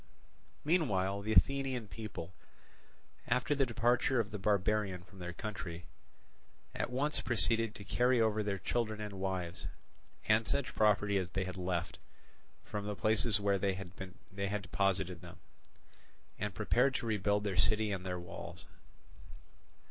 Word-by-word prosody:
Meanwhile 100 - +2
the 110 +2 -2
Athenian 135 -2 +3
people, 100 -5 -7 0.9
after 125 +4 +2
the 135 -2 +2
departure 120 +2 +2
of 110 -1 -1
the 105 - -4
barbarian 100 -2 +1
from 95 +1 -16
their 90 0 -4
country, 90 -4 -6 0.9
at - - -2
once 140 +4 0
proceeded 115 -1 +1
to 100 - -8
carry 125 +4 +3
over 110 -1 +3
their 100 -2 -1
children 110 +2 -1
and 105 -1 -5
wives, 95 -2 -3 0.6
and 110 +1 +3
such 135 -7 0
property 105 -2 +3
as 90 -2 -3
they 95 0 -1
had 90 0 -5
left, 90 -1 -2 0.7
from 105 -1 -4
the 105 - -2
places 110 0 +3
where 100 -1 +2
they 95 0 +1
had 95 0 -8 0.7
deposited 95 -1 0
them, - - -11 1.0
and 105 -2 -2
prepared 125 +6 +3
to - - -1
rebuild 105 -2 +1
their 100 -2 -1
city 110 +2 +3
and 95 -2 -2
their 90 -1 -3
walls. 85 -1 -8
105 Hz, 140 wpm, -34 LUFS, 95-115 Hz, 1.0 s, Athenian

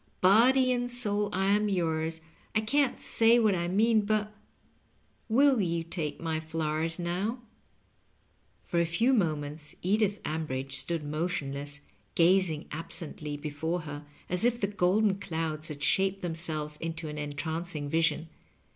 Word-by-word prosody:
Body 255 +7 +5
and 245 -1 0
soul 210 -4 0
I 190 +1 0
am 210 +1 +2
yours; 160 -3 -1 0.3
I 215 - +4
can't 275 +5 +1
say 230 +1 +4
what 220 -4 +4
I 175 -1 -1
mean, 215 +4 +3
but 210 0 -1 0.5
— - - -24
^will 260 -2 +5
you 170 -1 -1
take 165 -3 -4
my 160 -1 -2
flowers 160 0 -2
now? 190 +8 -2 0.6
" - - -40
For 170 - 0
a - - +2
few» 225 +11 +2
moments 150 - -1
Edith 205 +2 +2
Ambridge 135 -4 -3
stood 160 +4 0
motion 155 -1 -2
less, 140 0 -6 0.3
gazing 170 -3 +3
absently 150 -1 -5
before 155 +4 -3
her 145 -1 -7 0.2
as 180 +2 -2
if 240 0 +2
the 200 - +1
golden 200 +1 +2
clouds 160 -4 -3
had 145 -2 -6
shaped 195 +3 +2
themselves 160 -3 -2
into 165 0 -5
an 150 0 -5
entrancing 150 +1 -3
vision. 160 +1 +1
170 Hz, 145 wpm, -29 LUFS, 155-205 Hz, 0.6 s, Body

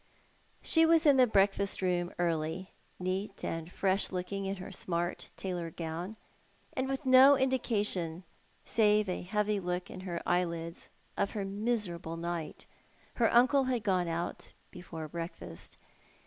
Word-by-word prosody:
She 325 - +4
was 325 0 +5
in 285 -3 +6
the 255 -1 +6
breakfast 200 -1 +2
room 180 -1 0
early, 170 +1 -1 0.3
neat 185 +3 -3
and 165 +1 -4
fresh 195 +1 +1
looking 190 +2 -3
in 195 +1 -2
her 185 +1 -8
smart 175 -2 -2
tailor 175 -3 -3
gown, 170 +6 -5 0.6
and 260 0 -1
with 270 +1 -3
no 265 +2 +8
indication, 210 -10 0 0.4
saive 210 -1 +3
a 180 - -2
heavy 210 +2 0
look 180 -1 -3
in 185 - -8
her 180 -2 -4
eyelids, 170 -1 -1 0.3
of 200 - 0
her 205 -3 -2
miserable 195 -5 -2
night. 170 -1 -4 0.5
Her 230 -2 +3
uncle 260 +3 +5
had 250 -4 -1
gone 185 -3 +1
out 170 +1 -4 0.2
before 165 -3 -7
breakfast. 170 +2 -7
190 Hz, 140 wpm, -31 LUFS, 175-220 Hz, 0.6 s, no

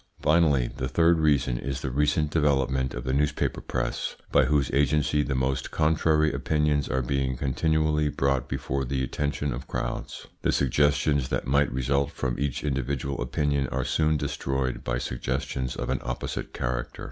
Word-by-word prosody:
Finally, 75 -5 +3
the 65 -1 -2
third 85 +4 +3
reason 70 -6 +2
is 65 0 -4
the 65 - -3
recent 75 +2 +1
development 65 -4 +1
of 60 - -5
the 65 0 -1
newspaper 75 +1 0
press, - - -2 0.2
by 65 - +5
whose 70 -1 +1
agency 75 +1 +2
the 70 -2 -1
most 65 +1 -1
contrary 80 0 +2
opinions 75 -2 +1
are 65 0 0
being 65 0 -1
continually 75 +2 +1
brought 70 -2 0
before 70 +1 -2
the 65 +1 -1
attention 70 +1 -2
of 65 +2 -7
crowds. - - -4 0.2
The - - +2
suggestions 70 0 +2
that - - -1
might 70 +2 +2
result 70 +2 0
from 65 -2 -3
each 70 -2 -2
individual 70 -1 -2
opinion 70 +1 0
are - - -2
soon 80 -1 +2
destroyed 65 -3 -2
by - - -1
suggestions 65 +1 -3
of - - -3
an - - -1
opposite 65 0 -4
character. - - -3
70 Hz, 160 wpm, -26 LUFS, 65-75 Hz, 0.2 s, by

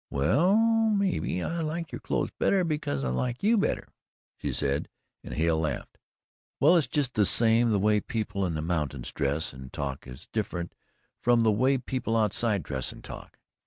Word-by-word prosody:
"Well, 145 - +3
mebbe, 215 - +1
I 170 0 -2
like 165 +2 -3
your - - -6
clothes - - -1
better, 195 -2 +1
because 150 - -2
I 65 - -1
like 120 - -2
you 225 +3 +4
better," 205 - 0 0.5
she - - -4
said, 70 0 0 0.3
and - - -9
Hale 80 0 +1
laughed. 75 -3 -4 0.6
"Well, 155 +6 +6
it's 165 -4 +3
just 140 -4 0
the 105 - +3
same 115 +3 +4
the 105 - +2
way 105 +2 +3
people 105 -3 -3
in 85 - -3
the 75 - -3
mountains 75 -7 -2
dress 75 +1 -1
and 65 0 -10
talk 70 -2 -5
is 65 +5 -9
different 90 -6 -3 0.5
from 120 -1 +3
the 110 - +4
way 130 +6 +2
people 125 -2 -2
outside 105 -2 +1
dress 65 -3 -2
and - - -13
talk. - - -10
110 Hz, 180 wpm, -27 LUFS, -, 0.6 s, Well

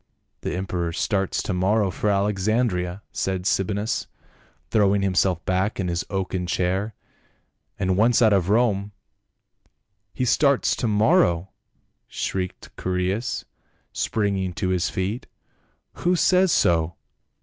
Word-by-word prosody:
"The - - -3
emperor 90 -2 -2
starts 95 +2 -1
to 100 - -2
morrow 95 +2 +2
for 105 +5 -1
Alexandria," 100 -1 0
said 95 -1 -2
Sabinus, 100 +3 0 0.6
throwing 100 -2 +3
himself 90 -2 +1
back 95 +4 0
in 90 -2 -1
his 85 0 -1
oaken 95 -2 -2
chair, 95 +4 -1 0.4
" - - -47
and 95 -2 +1
once 115 +4 +4
out 110 -3 +5
of 95 -2 +1
Rome 105 -2 +2 0.3
— - - -53
" - - -44
*' 100 -1 -51
He 125 - -2
starts 140 +2 +3
to 120 - -1
morrow 105 - +3 0.3
!" - - -45 0.2
shrieked 90 -1 -4
Chaereas 95 +6 -1 0.5
spring 100 -2 0
ing 95 -1 -2
to 95 +1 -2
his 90 -2 +1
feet. 100 +6 -3 0.4
" - - -46
Who 180 +1 +2
says 185 +1 +4
so 85 - +2
95 Hz, 140 wpm, -24 LUFS, 90-105 Hz, 0.6 s, out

